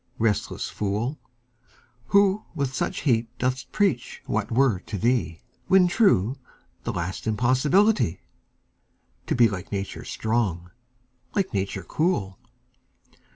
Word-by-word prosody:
Restless 110 -2 0
fool, 105 +8 -2 0.9
Who 200 +1 +3
with 140 -4 -1
such - - -2
heat 115 -5 +2
dost 125 +1 -2
preach 190 - 0
what 110 0 -2
were 120 -5 +3
to 100 - -6
thee, 100 -8 0 0.3
When 190 -1 +6
true, 135 - +3 0.5
the - - -1
last 90 +5 -4
impossibility 130 - +3 1.1
To - - +1
be 120 -2 +6
like 95 -3 -6
Nature 100 -1 -4
strong, 100 -7 -1 0.6
like 195 - 0
Nature 95 -1 -2
cool! 105 - -1
120 Hz, 110 wpm, -25 LUFS, 100-145 Hz, 1.1 s, When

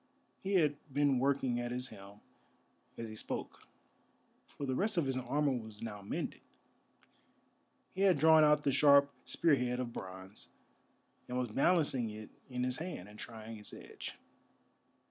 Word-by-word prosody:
He 195 0 -1
had 150 -5 +3
been 140 -1 +3
working 135 -2 +1
at 120 0 -3
his 125 +1 -3
helm 100 0 -13 0.8
as 115 - -5
he 110 - -8
spoke, - - -6 0.8
for 140 - -6
the 130 - -1
rest 205 +8 0
of 165 - +3
his 135 -1 -1
armour 135 +3 +1
was 110 -4 -5
now 105 -3 -6
mended. 100 - -4 1.5
He 190 - -3
had 190 -4 +5
drawn 160 +1 +7
out 150 0 +4
the 140 - +2
sharp 140 0 +6
spear 165 -3 +2
head 125 -2 +1
of 120 -2 -3
bronze, 95 +2 -9 0.8
and 125 - -3
was 125 -2 -1
balancing 135 -4 +3
it 110 0 -9 0.2
in 125 -1 -2
his 125 0 -1
hand 155 - -6
and 105 +1 -13
trying 110 -1 -8
its 105 - -7
edge. - - -8
125 Hz, 160 wpm, -34 LUFS, 110-145 Hz, 1.5 s, drawn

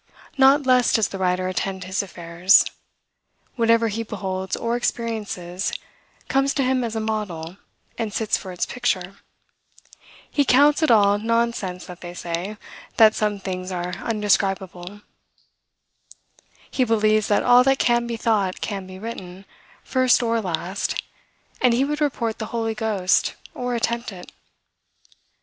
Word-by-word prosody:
Not 275 +1 +5
less 255 -2 +4
does 220 - +2
the 195 - -6
writer 185 0 0
attend 190 0 -3
his 190 +1 -1
affairs. 175 0 +3 0.9
Whatever 230 -1 +3
he 220 +2 -3
beholds 190 -3 -4
or 235 0 -1
experiences, 210 -7 -3 0.6
comes 275 +1 +1
to 275 - +1
him 255 0 +1
as 230 -1 -3
a - - 0
model, 200 -6 -4 0.4
and 225 -2 -2
sits 215 +1 0
for 190 - -6
its 180 - -2
picture. 195 -6 -2 1.1
He 285 - +1
counts 285 +4 +4
it 315 - +3
all 205 -3 +5
nonsense 225 -5 -1
that 180 -1 -11
they 175 0 -8
say, 175 +5 -4 0.4
that 220 -1 +7
some 210 -2 -1
things 185 -1 -5
are 180 0 -3
undescribable. 195 -3 -1 1.7
He 260 - +1
believes 215 -2 +2
that 205 - +2
all 245 0 +6
that 270 +1 +3
can 240 -2 +2
be 235 -1 -3
thought 210 -5 0
can 195 -3 -4
be 185 0 -10
written, 190 -3 -8 0.4
first 255 -1 +3
or 230 -1 +1
last; 180 +1 -2 0.6
and 245 -2 +4
he 265 +3 +2
would 295 +1 -3
report 235 -6 -1
the 220 - -4
Holy 225 -1 -2
Ghost, 210 -4 +1 0.2
or 245 -1 -3
attempt 235 0 -1
it. 180 -2 -11
215 Hz, 145 wpm, -23 LUFS, 185-235 Hz, 1.7 s, that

